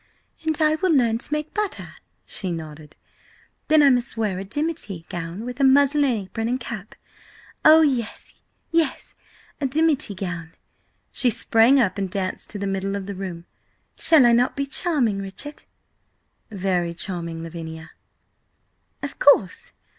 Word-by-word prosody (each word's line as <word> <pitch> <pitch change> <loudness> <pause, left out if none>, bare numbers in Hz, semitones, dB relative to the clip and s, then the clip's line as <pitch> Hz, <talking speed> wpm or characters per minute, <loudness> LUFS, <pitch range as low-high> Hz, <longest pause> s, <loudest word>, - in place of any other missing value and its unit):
"And 315 -1 +1
I 310 -1 +3
will 370 +1 +1
learn 235 -6 +2
to 270 - +5
make 300 0 -3
butter," 420 -2 -3 0.4
she 185 -3 -4
nodded. 155 -2 -8 0.7
"Then 310 -1 +5
I 280 - +6
must 245 -2 0
wear 205 -5 -1
a - - -4
dimity 215 - -3
gown 175 +5 -6
with 250 +2 -7
a - - +2
muslin 285 +2 +4
apron 225 -3 -2
and 250 +2 -1
cap. 220 -4 -7 0.7
Oh, 315 +1 +8
yes, 255 -8 -2 0.3
yes–a 325 -3 -3
dimity 295 -6 +1
gown!" 180 -4 -6 0.6
She 250 - +2
sprang 230 +4 +4
up 205 -5 +1
and 195 -1 -2
danced 185 0 -3
to 210 - -3
the 200 - -4
middle 195 0 -2
of 200 -1 -5
the 200 - -5
room. 185 -3 -7 0.5
"Shall 310 -6 +5
I 240 - +6
not 245 +2 +2
be 280 - -1
charming, 275 - 0
Richard?" 195 +10 -7 0.8
"Very 180 -4 -2
charming, 170 -3 -4
Lavinia!" 160 -1 -8 1.1
"Of 285 - -6
course! 225 -10 +3
225 Hz, 145 wpm, -23 LUFS, 185-285 Hz, 1.1 s, Oh